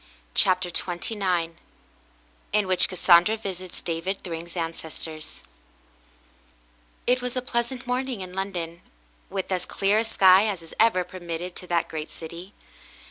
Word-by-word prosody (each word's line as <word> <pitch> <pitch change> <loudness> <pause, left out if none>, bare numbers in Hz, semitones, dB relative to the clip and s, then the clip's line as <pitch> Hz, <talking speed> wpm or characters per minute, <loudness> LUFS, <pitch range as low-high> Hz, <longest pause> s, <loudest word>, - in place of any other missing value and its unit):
CHAPTER 185 -1 +3
XXIX 175 -2 -1 1.0
IN 210 -1 +3
WHICH 185 -1 +4
CASSANDRA 185 +3 +5
VISITS 185 -4 -6
DAVID 175 +4 -2
THRYNG*S 170 0 -6
ANCESTORS 160 -1 -5 1.6
It 250 +1 +3
was 250 0 -3
a 255 - 0
pleasant 245 +1 -2
morning 250 -2 -1
in 180 -1 -7
London, 175 -3 -3 0.5
with 190 0 -3
as 180 -1 -1
clear 200 +2 +2
a - - +2
sky 195 -2 +6
as 190 -5 -2
is 165 - -11
ever 215 -5 +5
permitted 175 -1 -6
to 180 - -8
that 170 -1 +1
great 155 -1 -5
city. 170 +4 -9
185 Hz, 135 wpm, -26 LUFS, 170-210 Hz, 1.6 s, sky